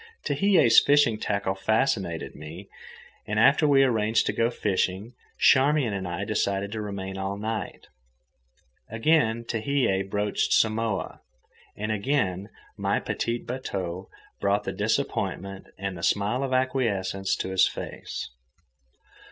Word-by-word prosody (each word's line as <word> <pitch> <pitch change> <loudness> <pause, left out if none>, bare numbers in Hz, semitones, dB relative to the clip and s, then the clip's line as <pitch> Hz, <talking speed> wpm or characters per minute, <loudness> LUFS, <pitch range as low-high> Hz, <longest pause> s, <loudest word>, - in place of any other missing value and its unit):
Tehei's 145 - +5
fishing 140 -7 +3
tackle 100 -2 -1
fascinated 95 -3 -1
me, 80 +6 -10 0.6
and 105 +1 0
after 140 +6 +5
we 135 -1 +5
arranged 110 -3 +2
to - - 0
go 115 0 +1
fishing, 100 0 -1 0.2
Charmian 140 -3 +4
and 95 -2 -3
I 90 +3 -3
decided 100 -1 -1
to 110 0 -4
remain 95 -2 -5
all 95 +1 -3
night. 110 0 -4 1.0
Again 115 -1 +2
Tehei 115 -4 0
broached 105 +1 -1
Samoa, 110 -2 0 0.6
and 105 +1 -3
again 100 -4 -1 0.3
my - - 0
petit 115 0 -3
bateau 95 -8 -5 0.3
brought 100 +1 +1
the - - -4
disappointment 95 0 -2
and 100 -1 -4
the 85 - -8
smile 105 +8 +1
of 135 -1 -2
acquiescence 100 -8 0
to - - -4
his 95 0 +4
face. - - -6
105 Hz, 125 wpm, -26 LUFS, 95-120 Hz, 1.0 s, Tehei's